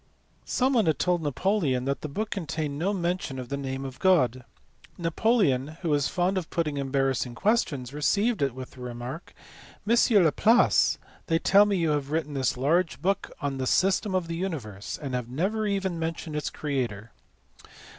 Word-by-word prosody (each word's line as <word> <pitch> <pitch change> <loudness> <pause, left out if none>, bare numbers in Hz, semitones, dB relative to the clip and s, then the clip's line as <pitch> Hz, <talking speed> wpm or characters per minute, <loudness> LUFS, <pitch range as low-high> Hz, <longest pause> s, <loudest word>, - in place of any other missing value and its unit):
Someone 250 -6 +2
had 155 -4 +2
told 180 -2 +1
Napoleon 145 -3 0
that 140 0 -1
the - - -4
book 215 +9 -3
contained 155 -5 -3
no 185 +5 +1
mention 175 -6 -2
of 125 -2 -6
the 140 - -2
name 135 -1 -4
of 130 -1 -8
God; 130 -10 +3 0.5
Napoleon, 165 - +1
who 170 - 0
was 145 -2 +2
fond 185 +2 0
of 170 - -9
putting 155 -4 -1
embarrassing 135 -3 0
questions, 140 - 0
received 200 - +1
it 135 -3 0
with 130 -1 -8
the 130 - -13
remark, 125 +6 -7 0.5
"M. 235 - +4 0.3
Laplace, 215 +9 +4 0.3
they 165 - +3
tell 200 +4 +5
me 200 -2 +1
you 165 -3 +1
have 145 -2 -1
written 155 -1 -2
this 130 -3 0
large 165 +7 +1
book 190 +5 0
on 140 -2 -2
the 130 - -1
system 190 - +2
of 180 -3 0
the 165 - -3
universe, 135 - -4
and 140 -4 -6
have 125 -2 -3
never 200 - -1
even 190 -4 -1
mentioned 165 -1 -4
its 150 - -2
Creator." 120 -7 -3
155 Hz, 175 wpm, -27 LUFS, 135-185 Hz, 0.5 s, tell